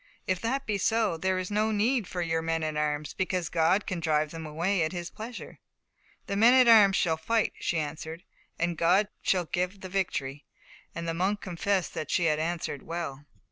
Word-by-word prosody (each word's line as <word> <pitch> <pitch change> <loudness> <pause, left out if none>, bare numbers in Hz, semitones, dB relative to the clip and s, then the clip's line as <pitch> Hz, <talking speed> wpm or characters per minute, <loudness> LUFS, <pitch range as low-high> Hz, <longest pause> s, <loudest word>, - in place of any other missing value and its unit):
If 185 -1 -1
that 265 +4 -1
be 210 -2 -1
so, 220 -2 +1
there 185 +3 0
is 185 +1 -4
no 215 +1 +1
need 220 +1 +1
for 175 -1 -3 0.2
men 165 0 -1
at 155 -1 -2
arms, 150 -1 -1
because 185 -3 -1
God 175 +4 +2
can 185 - -3
drive 155 -2 +1
them 160 -1 -7
away 170 +5 0
by 185 - -9
His 175 -1 -5
pleasure." 230 +3 -8 0.7
"The 200 - -3
men 230 +5 +6
at 255 -2 +6
arms 210 -4 +7
shall 165 -3 +1
fight," 225 +7 0
she 170 - -1
answered, 160 +2 -5 0.3
"and 170 -1 -1
God 185 +5 +3
shall 180 -2 +1
give 180 +4 -2
the 185 - -7
victory"; 145 -7 -2 0.5
and 170 0 -4
the 165 - -1
monk 190 +5 0
confessed 185 0 -1
that 155 - -5
she 175 - +1
had 155 -2 +2
answered 165 -3 -3
well. 155 -4 -5
175 Hz, 195 wpm, -28 LUFS, 160-200 Hz, 0.7 s, arms